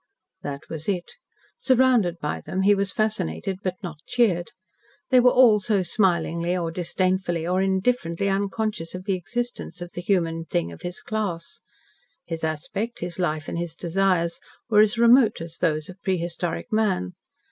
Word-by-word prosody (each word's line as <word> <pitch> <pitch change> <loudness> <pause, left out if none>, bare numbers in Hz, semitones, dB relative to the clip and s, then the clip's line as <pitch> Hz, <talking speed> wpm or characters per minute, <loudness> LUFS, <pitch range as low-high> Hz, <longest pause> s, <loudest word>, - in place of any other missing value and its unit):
That 140 -1 -5
was 160 +3 -5
it. 180 -3 -2 0.5
Surrounded 250 -9 +3
by 150 - -3
them, 190 +1 -2
he 205 +1 +6
was 200 0 0
fascinated 190 - -1
but 185 -2 -2
not 165 -4 -6
cheered. 185 -8 +2 0.6
They 255 - +7
were 250 0 +6
all 245 -4 +6
so 200 -2 +1
smilingly, 175 -2 +1
or 170 -2 -2
disdainfully, 180 0 0
or 180 +2 +1
indifferently 190 -2 0
unconscious 195 -3 -1
of 185 0 -7
the 200 - +1
existence 240 +1 -4
of 175 0 -7
the 175 - -5
human 165 -3 0
thing 85 - -1
of 85 - -11
his 175 +1 -5
class. 215 - -4 0.6
His 165 -1 -5
aspect, 170 +9 -3
his 175 +1 -5
life, 155 -3 -1
and 170 - -3
his 170 -1 -4
desires 175 -1 +1 0.3
were 210 - +6
as 215 +1 +4
remote 235 -2 +5
as 165 0 -7
those 155 -1 0
of 185 +1 -12
prehistoric 175 +3 -2
man. 195 - +1
185 Hz, 160 wpm, -24 LUFS, 170-210 Hz, 0.6 s, They